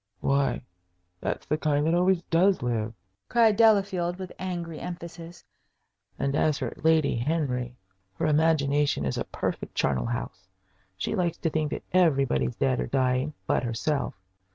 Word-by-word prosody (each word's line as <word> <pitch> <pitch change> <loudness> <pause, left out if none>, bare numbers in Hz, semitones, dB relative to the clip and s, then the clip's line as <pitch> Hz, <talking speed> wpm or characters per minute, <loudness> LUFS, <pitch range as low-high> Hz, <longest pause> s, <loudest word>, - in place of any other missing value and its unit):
"Why, 140 0 +1 0.6
that's - - -3
the 150 - -1
kind 150 -1 +1
that 165 - +2
always 180 0 +3
does 180 -1 +2
live!" 115 -2 -1 0.3
cried 225 -3 +4
Delafield, 195 -5 +3
with 185 -1 -7
angry 175 -3 -4
emphasis. 170 -1 -8 0.7
"And 140 0 -1
as 150 -1 +2
for - - -3
Lady 160 -5 +3
Henry, 125 -3 -1 0.4
her - - -1
imagination 145 - +2
is 65 - -1
a - - -2
perfect - - -4
charnel 70 - +1
house. 95 -6 -5 0.5
She 95 - -2
likes 175 -5 0
to 165 - -1
think 155 -1 0
that - - -5
everybody's 135 - +2
dead 65 -2 +1
or 60 - -1
dying 130 - 0
but - - +1
herself. 125 +4 -1
150 Hz, 150 wpm, -27 LUFS, 125-175 Hz, 0.7 s, cried